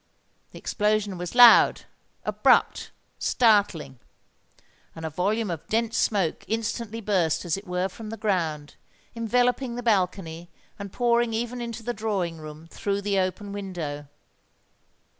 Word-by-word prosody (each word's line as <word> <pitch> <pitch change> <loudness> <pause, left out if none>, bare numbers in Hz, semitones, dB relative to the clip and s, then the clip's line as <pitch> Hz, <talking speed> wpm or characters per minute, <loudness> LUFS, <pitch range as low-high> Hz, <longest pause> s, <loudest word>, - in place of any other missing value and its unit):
The - - -13
explosion 210 -2 0
was 180 +5 -6
loud—abrupt—startling; 210 - +3 1.0
and 160 - -7
a 160 - -4
volume 200 +5 -1
of 165 -3 -6
dense 230 0 0
smoke 195 -7 0
instantly 225 0 -3
burst 185 -6 0
as 170 - 0
it 195 +1 -9
were 180 +1 -1
from 215 +3 -10
the 225 - -6
ground, 165 -8 -2 0.4
enveloping 245 +2 0
the 245 - -5
balcony, 180 -6 -1 0.3
and 200 -1 -7
pouring 235 -1 +1
even 240 +2 -3
into 230 -1 -6
the 240 +2 -2
drawing 195 -7 -2
room 155 +1 -10
through 200 +3 -3
the 200 -1 0
open 190 +2 -2
window. 170 -8 -5
205 Hz, 125 wpm, -25 LUFS, 175-225 Hz, 1.0 s, loud—abrupt—startling